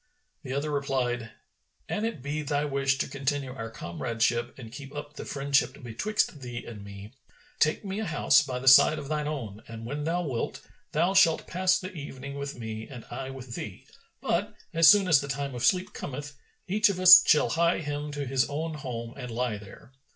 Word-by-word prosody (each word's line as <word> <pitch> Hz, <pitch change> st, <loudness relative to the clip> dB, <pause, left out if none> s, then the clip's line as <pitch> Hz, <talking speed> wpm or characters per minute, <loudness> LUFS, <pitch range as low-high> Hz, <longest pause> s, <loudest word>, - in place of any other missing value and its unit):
The 130 Hz, -4 st, -6 dB
other 145 Hz, +2 st, -2 dB
replied, 125 Hz, -5 st, -1 dB, 0.6 s
"An 215 Hz, -, -2 dB
it 225 Hz, -, -4 dB
be 145 Hz, +2 st, -2 dB
thy 145 Hz, 0 st, -1 dB
wish 135 Hz, -1 st, +1 dB
to -, -, -1 dB
continue 135 Hz, -1 st, -2 dB
our 115 Hz, -3 st, -6 dB
comradeship 115 Hz, +4 st, -2 dB
and 115 Hz, -4 st, -10 dB
keep 135 Hz, +2 st, -10 dB
up 145 Hz, 0 st, -7 dB
the -, -, -8 dB
friendship 140 Hz, 0 st, 0 dB
betwixt 145 Hz, -, -1 dB
thee 120 Hz, -1 st, -6 dB
and 105 Hz, -4 st, -9 dB
me, 100 Hz, +1 st, -10 dB, 0.5 s
take 155 Hz, +6 st, +2 dB
me 195 Hz, +1 st, -3 dB
a 220 Hz, -, -2 dB
house 150 Hz, -2 st, +4 dB
by 130 Hz, -4 st, -4 dB
the 130 Hz, +1 st, -6 dB
side 135 Hz, +4 st, +8 dB
of 145 Hz, -2 st, -7 dB
thine 150 Hz, -1 st, -1 dB
own 115 Hz, -9 st, -5 dB
and 115 Hz, 0 st, -8 dB
when 145 Hz, +4 st, -4 dB
thou 175 Hz, +2 st, 0 dB
wilt, 130 Hz, -8 st, -3 dB, 0.3 s
thou 170 Hz, +5 st, +2 dB
shalt 190 Hz, -5 st, +4 dB
pass 185 Hz, +1 st, +2 dB
the 185 Hz, 0 st, -7 dB
evening 140 Hz, -3 st, -7 dB
with 140 Hz, -1 st, -5 dB
me 110 Hz, -1 st, -6 dB
and 125 Hz, -5 st, -10 dB
I 130 Hz, +2 st, -5 dB
with 130 Hz, -2 st, -9 dB
thee; 105 Hz, -5 st, -7 dB, 0.4 s
but, -, -, -1 dB, 0.2 s
as 165 Hz, 0 st, +6 dB
soon 205 Hz, -2 st, +7 dB
as 160 Hz, -6 st, +5 dB
the 140 Hz, -, -6 dB
time 140 Hz, 0 st, -3 dB
of 120 Hz, -, -5 dB
sleep 185 Hz, 0 st, +2 dB
cometh, 145 Hz, +2 st, -6 dB, 0.3 s
each 210 Hz, +3 st, +3 dB
of 190 Hz, -2 st, -2 dB
us 185 Hz, 0 st, +11 dB
shall 150 Hz, -, +5 dB
hie 170 Hz, +1 st, +2 dB
him 145 Hz, 0 st, -4 dB
to 145 Hz, -1 st, -3 dB
his 130 Hz, +1 st, +1 dB
own 160 Hz, +3 st, -3 dB
home 120 Hz, -6 st, -6 dB
and 125 Hz, -3 st, -7 dB
lie 115 Hz, -2 st, -2 dB
there." 105 Hz, +5 st, -14 dB
140 Hz, 200 wpm, -28 LUFS, 125-155 Hz, 0.6 s, us